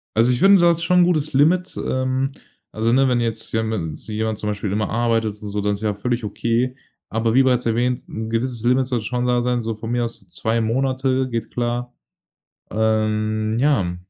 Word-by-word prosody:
Also, 115 +3 +4
ich 120 - 0
finde 195 0 +6
das 170 -1 +4
ist 170 - -5
schon 180 +1 +3
'n - - +7
gutes 155 -4 +1
Limit, 170 +7 +2
ähm, 130 +1 0 0.5
also, 115 +1 0
ne, 135 +2 +4
wenn 125 -2 +2
jetzt 115 -1 -3
ja 110 0 +1
ma 110 -1 -2 0.2
sich - - -13
jemand 110 -1 -1
zum 105 - -2
Beispiel 105 -1 -3
immer 105 -1 -1
arbeitet 115 -2 0
und 105 - -6
so, 105 0 -2
das 105 0 0
ist 100 - -13
ja 105 -1 +1
völlig 120 +3 -2
okay. 115 +5 -1 0.3
Aber 115 +1 0
wie 135 +2 +5
bereits 125 -1 +2
erwähnt, 120 +2 +1
'n 110 0 -5
gewisses 115 0 -2
Limit 125 +1 +3
sollte 120 -4 -2
schon 125 0 -1
da 125 0 +2
sein, 125 0 0
so 115 0 -3
von 110 +1 -7
mir 120 0 +1
aus 115 0 -5
so - - -25
2 110 +6 -2
Monate, 130 +3 0
geht 115 -2 -3
klar. 120 0 -2 0.8
Ähm, 110 0 0
ja. 110 -11 +2
115 Hz, 215 wpm, -21 LUFS, 110-130 Hz, 0.8 s, n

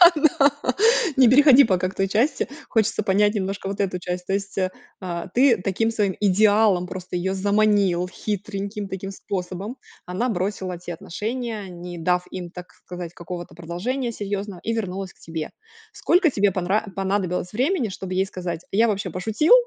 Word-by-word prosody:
на 285 -2 +4 0.7
не 255 -3 +7
переходи 280 0 +8
пока 185 -5 +1
к - - -11
той 195 - +1
части, 235 +10 +1 0.2
хочется 220 -2 +1
понять 205 +2 +3
немножко 195 0 -2
вот 200 +1 -5
эту 190 -2 0
часть. 180 0 -4
То 195 - 0
есть, 200 0 -3
э, 185 -1 +1 0.3
а, 170 -1 -4
ты 255 -1 +5
таким 210 +5 0
своим 205 -4 +1
идеалом 205 -2 +4
просто 180 -1 -6
её 190 +2 -1
заманил, 200 -2 +2
хитреньким 200 0 -4
таким 195 0 -5
способом. 195 +4 -5 0.3
Она 185 +8 -1
бросила 185 -2 -2
те 175 0 -7
отношения, 215 +4 -4
не 175 0 -8
дав 180 +2 +1
им, 180 -2 -6
так 180 0 -10
сказать, 175 -2 -7
какого-то 175 0 -7
продолжения 205 +10 -3
серьёзного 200 -3 -4
и 230 - -1
вернулась 195 -3 -3
к - - -32
тебе. 160 -1 -5 0.4
Сколько 350 -4 +3
тебе 205 -2 +2
понра 185 +4 0
понадобилось 190 -2 -1
времени, 265 - +1
чтобы 190 -1 -6
ей 190 - +2
сказать: 175 -3 -5
"Я 225 +4 +4
вообще 200 -2 -1
пошутил, 220 - +3
195 Hz, 165 wpm, -23 LUFS, 180-215 Hz, 0.7 s, переходи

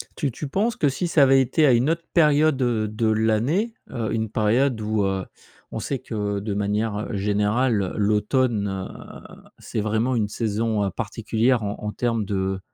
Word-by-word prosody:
Tu 145 -6 -1
tu 150 - -6
penses 210 +10 0
que 145 - +2
si 175 +6 -2
ça 155 -4 +4
avait 135 0 +5
été 150 +5 +2
à 130 - +5
une 125 +6 +2
autre 165 0 -1
période, 150 -3 +4
heu, 115 -3 +1
de 110 +2 -1
l'année, 110 - +1 0.2
heu, 115 -4 -3
une 110 -1 -1
période 115 +3 +1
où, 105 -1 0
heu, 95 -1 -1 0.5
on 110 - -4
sait 135 +4 -3
que 105 -2 -3
de 105 0 -3
manière, 105 +1 -1
heu, - - -3
générale, 105 +3 +1
heu, 95 - -3
l'automne, 105 +1 +1
heu, 95 -1 -8 0.2
c'est - - -4
vraiment 110 +4 0
une 105 -3 +1
saison, 110 -1 -1
heu, - - 0
particulière 115 +1 0
en 100 0 -3
en 105 0 -4
termes 115 -3 -1
de 95 -1 -2
110 Hz, 190 wpm, -23 LUFS, 105-130 Hz, 0.5 s, avait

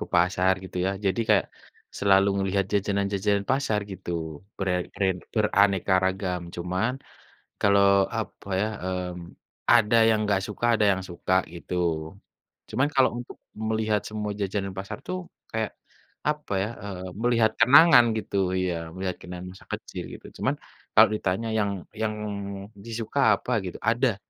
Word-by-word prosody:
ke 105 - -4
pasar 90 +2 +3
gitu 95 - -9
ya, - - +2 0.2
jadi 95 +4 +1
kayak 105 -3 +4 0.5
selalu 100 0 +4
ngelihat 95 0 +1
jajanan-jajanan 100 0 +1
pasar 130 -5 +1
gitu, 95 -2 -7 0.5
ber 95 - -2
a - - +1 0.2
ren 95 -2 +2 0.2
beraneka 100 -3 +3
ragam, 95 -1 -1
cuman 90 +7 -1 0.7
kalau, 100 -1 +5 0.3
apa 100 -1 -7
ya, 105 - +1 0.2
mmm, 90 -2 -4 0.4
ada 115 -1 +5
yang 110 -1 +3
enggak 100 -2 +1
suka, 105 +2 -3
ada 110 -2 +3
yang 95 -1 -1
suka, 90 +1 -2 0.2
gitu. 85 +1 -6 1.0
Cuman 130 +6 +2
kalau 135 - +5
untuk 120 - -9 0.2
melihat 110 -1 0
semua 105 -1 -3
jajanan 100 0 -2
pasar 100 +2 -5
tuh 185 - -2 0.3
kayak, 110 -1 -1 0.6
apa 150 -7 -2
ya, 105 - -3
eee, 95 -2 -6 0.2
melihat 115 -2 +3
kenangan 135 +1 +8
gitu 105 - -3 0.2
ya, 90 -1 0 0.2
melihat 95 -1 -3
kenangan 90 0 -8
masa 95 - -16
kecil, - - -6
gitu. - - -10
Cuman - - +1 0.4
kalau - - +9
ditanya 100 +2 -1
yang 100 -1 +1 0.3
yang 110 -1 0 0.7
disuka 115 +3 -3 0.2
apa - - -6
gitu, 90 - -5
ada. 120 -1 +1
100 Hz, 145 wpm, -26 LUFS, 95-110 Hz, 1.0 s, kalau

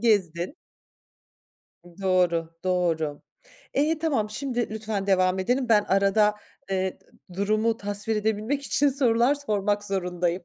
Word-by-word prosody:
gezdin. 190 - +1 1.5
Doğru, 175 -3 +1
doğru. 165 -5 0 0.5
İyi, 305 +3 +2
tamam. 270 -10 0
Şimdi 245 0 -2
lütfen 215 -2 -3
devam 185 -1 +2
edelim. 245 +7 0
Ben 210 -2 +4
arada, 200 +2 +3 0.4
eee, 190 -1 -1
d - - -29 0.3
durumu 215 +4 +1
tasvir 205 +1 -1
edebilmek 220 +6 -1
için 285 +1 +2
sorular 255 -1 +3
sormak 205 -7 -1
zorundayım. 180 -2 -1
205 Hz, 115 wpm, -25 LUFS, 185-230 Hz, 1.5 s, Ben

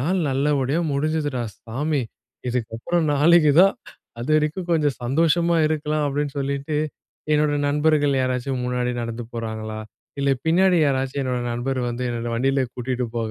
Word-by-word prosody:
நாள் 175 +8 +1
நல்லபடியா 140 +2 +1
முடிஞ்சுதுடா 145 -2 -1 0.2
சாமி. 140 +6 -1 0.5
இதுக்கப்புறம் 125 +8 -1
நாளைக்கு 155 +1 +5
தான். 195 +1 +5 0.5
அது 120 - -5
வரைக்கும் 155 +4 -1
கொஞ்சம் 150 -4 +1
சந்தோஷமா 165 +6 +2
இருக்கலாம்." 155 -1 0
அப்டின்னு 145 0 -2
சொல்லிட்டு, 140 +2 -2 0.6
"என்னோட 150 0 +3 0.2
நண்பர்கள் 145 -1 +2
யாராச்சும் 130 0 -1
முன்னாடி 125 0 -1
நடந்து 115 0 -4
போறாங்களா? 110 -1 -4 0.4
இல்லை 140 0 +3
பின்னாடி 180 +3 +4
யாராச்சும் 135 0 -1
என்னோட 125 -2 -1
நண்பர் 130 +2 -2
வந்து, 120 +1 -4
என்னோட 120 0 -3
வண்டியிலயே 135 +2 +1
கூட்டிட்டு 125 0 -2
போக 115 -1 -1
140 Hz, 135 wpm, -23 LUFS, 125-155 Hz, 0.6 s, நாளைக்கு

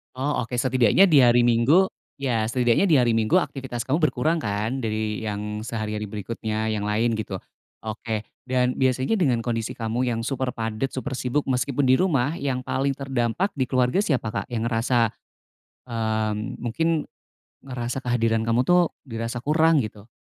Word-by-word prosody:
Oh 130 -3 -1
oke 125 - -4
setidaknya 130 +8 +4
di 145 - +7
hari 120 -1 +5
Minggu 120 +11 +4 0.2
ya 120 -6 -1
setidaknya 120 - +2
di 160 - +4
hari 120 -3 +4
Minggu 110 +7 +2
aktivitas 130 -9 -1
kamu 145 +5 0
berkurang 155 +2 +1
kan 110 +4 -2
dari 110 -2 -2
yang 105 -1 -4
sehari-hari 110 -2 -4
berikutnya 110 +1 -3
yang 105 -1 -2
lain 115 +3 +1
gitu, 100 -3 -4 0.5
oke 110 0 -4 0.2
dan 125 0 +2
biasanya 130 - +1
dengan 125 -8 +2
kondisi 115 -2 -2
kamu 120 +2 -1
yang 115 -1 -1
super 130 0 -2
padat, 115 +3 -2
super 130 +1 -4
sibuk 130 +4 0
meskipun 130 +2 0
di 130 +3 +4
rumah 145 -7 +2
yang 130 -2 -2
paling 135 0 -1
terdampak 135 - -1
di 130 - +1
keluarga 125 +8 +2
siapa 135 - 0
Kak? - - -3
Yang 115 -2 -3
ngerasa, 120 +2 +1 0.9
mmm, 110 -2 -1 0.2
mungkin, 140 +8 -1 0.8
ngerasa 125 0 -4
kehadiran 115 -2 0
kamu 115 +2 +3
tuh 175 +3 +3
dirasa 115 -1 -5
kurang 155 -1 +3
gitu. 105 0 -9
120 Hz, 160 wpm, -24 LUFS, 110-135 Hz, 0.9 s, di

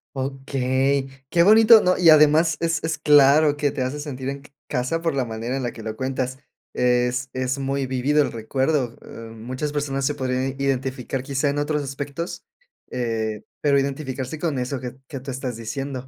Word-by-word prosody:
Okey, 135 0 -1 0.2
qué 170 - +4
bonito, 220 +3 +8
¿no?, 180 0 +2
y 170 -3 +7
además, 155 +2 +5
es 165 -2 -1
es 160 -2 -2
claro 145 0 +5
que 145 -1 +1
te 140 -3 -4
hace 130 +4 -2
sentir 135 -3 -5
en 140 0 -5
ca 145 - -18 0.2
casa 135 +5 -1
por 165 -4 -1
la 130 -2 0
manera 115 +3 -4
en 130 - -3
la 120 - -2
que 115 - -11
lo 110 0 -5
cuentas, 130 0 -3 0.4
es 125 +1 +1
es 130 +1 -1
muy 135 0 -2
vivido 135 +4 +2
el - - 0
recuerdo, 130 +2 -1
eh, - - -16 0.3
muchas 130 +6 -4
personas 135 -2 -1
se 145 - +1
podrían 130 -1 -2
identificar 130 -1 -2
quizá 140 +1 0
en 145 - -2
otros 145 0 0
aspectos, 140 +4 -5 0.5
eh, 110 -3 -2 0.2
pero 140 -2 +3
identificarse 135 0 -3
con 150 -5 -2
eso 125 +1 -3
que 125 0 -7
que 135 -4 -6
tú 135 +1 -7
estás 125 -2 -4
diciendo, 130 +3 -5
135 Hz, 185 wpm, -23 LUFS, 130-145 Hz, 0.5 s, bonito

